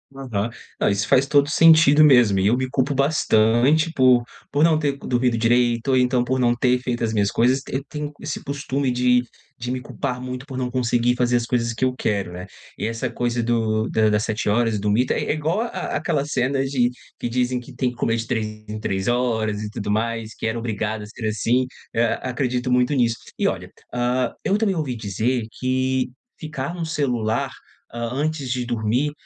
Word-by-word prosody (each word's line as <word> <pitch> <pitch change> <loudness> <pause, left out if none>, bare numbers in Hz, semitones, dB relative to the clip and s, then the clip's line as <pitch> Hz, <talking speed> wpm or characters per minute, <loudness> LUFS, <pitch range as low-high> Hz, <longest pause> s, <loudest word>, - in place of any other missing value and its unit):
Aham. 120 -5 -3 0.3
Não, - - +3
isso 100 +1 0
faz 135 +1 +4
todo 140 0 +4
sentido 160 -2 +6
mesmo. 125 -9 +5
Eu 105 +6 +3
me 130 0 -1
culpo 135 +2 0
bastante 140 +2 +3
por 130 -2 +5 0.3
por 145 +2 +2
não 160 -1 +5
ter 140 -3 -1
dormido 125 -3 0
direito 120 +1 +2
ou 130 - +4
então 125 -1 +2
por 130 +1 -1
não 120 -1 +3
ter 125 +1 +2
feito 125 -2 -3
as 110 -1 0
minhas 100 -2 +2
coisas, 125 +5 +2
eu 135 +1 -2
tenho 150 -1 -5
esse 155 - -5
costume 140 -1 -2
de 125 0 +3 0.4
de 120 +1 -4
me 130 0 -3
culpar 125 0 -4
muito 125 +1 -6
por 135 -3 -6
não 125 -1 -2
conseguir 120 -1 +1
fazer 125 0 +2
as 120 -1 +1
coisas 115 -1 0
que 115 - -4
eu 130 -1 +2
quero, 100 -7 -2
né. 90 +2 -8 0.3
E - - -2
essa 115 +3 -2
coisa 120 0 -1
do 110 -1 0
da 110 -1 +3
da 105 0 +2
7 105 0 -2
horas, 115 0 +1
do 105 +1 -1
mito, 115 +5 +2
é - - -1
é - - 0
igual 160 +7 -1
a 235 - -1 0.3
àquela 155 -2 -1
cena 135 -1 0
de 130 -3 +1 0.3
que 120 - -3
dizem 125 +1 0
que 125 +3 -12
tem 125 -1 0
que - - -14
comer 115 -1 0
de 115 0 -3
3 110 -2 -1 0.2
em 105 0 -5
3 95 -2 -2
horas 110 -4 0
e 105 - -4
tudo 105 -1 -4
mais, 115 +1 -2
que - - -4
era 110 +1 -2
obrigado 110 -2 -3
a - - -7
ser 110 +1 -6
assim, 120 +4 +1 0.3
e 115 - -1
a 115 -1 +2
acredito 125 0 -2
muito 125 +3 +3
nisso. 115 -3 +2 0.2
E - - +1
olha, - - -3 0.2
hã, 125 0 0
eu 200 - +2
também 210 -3 +1
ouvi 145 -7 -2
dizer 115 +3 -1
que 130 0 0 0.3
ficar 150 -1 -4
no 170 -2 -4
celular, 125 -8 -1 0.4
hã, 120 0 -3
antes 145 -1 -2
de 125 -1 -1
dormir, 120 +4 0
125 Hz, 210 wpm, -22 LUFS, 115-135 Hz, 0.4 s, sentido